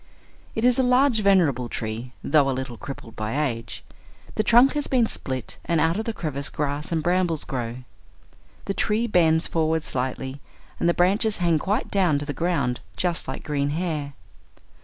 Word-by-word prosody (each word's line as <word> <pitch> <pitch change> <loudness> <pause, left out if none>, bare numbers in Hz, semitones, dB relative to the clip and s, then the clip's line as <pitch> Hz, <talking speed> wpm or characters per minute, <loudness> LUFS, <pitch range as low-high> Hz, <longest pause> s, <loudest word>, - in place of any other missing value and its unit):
It 225 - 0
is 250 0 +4
a - - +6
large 250 -1 +3
venerable 165 - +3
tree, 115 +3 -4
though 145 -3 +3
a 130 - -1
little 130 -2 -4
crippled 115 -2 -9
by 110 +6 -2
age. 115 -3 -7 0.5
The - - +1
trunk 240 +5 +5
has 295 -1 -2
been 250 -3 +3
split, 130 - -4
and 170 -1 +1
out 160 +2 +2
of 220 - -2
the 230 - -1
crevice 150 -8 -3
grass 145 +1 -3
and 160 -2 0
brambles 175 -2 +1
grow. 125 -1 -4 0.8
The 195 - -1
tree 215 +3 +1
bends 165 -6 +3
for 160 -1 0
ward 160 0 0
slightly, 130 +2 -3 0.4
and 170 - +2
the 170 - +2
branches 205 +4 +2
hang 170 -3 +2
quite 210 - -1
down 180 -7 +3
to 145 - -4
the 145 - -3
ground 140 -6 0 0.2
just 175 +7 0
like - - -5
green 145 -2 -1
hair. 155 -5 -2
160 Hz, 180 wpm, -24 LUFS, 135-195 Hz, 0.8 s, a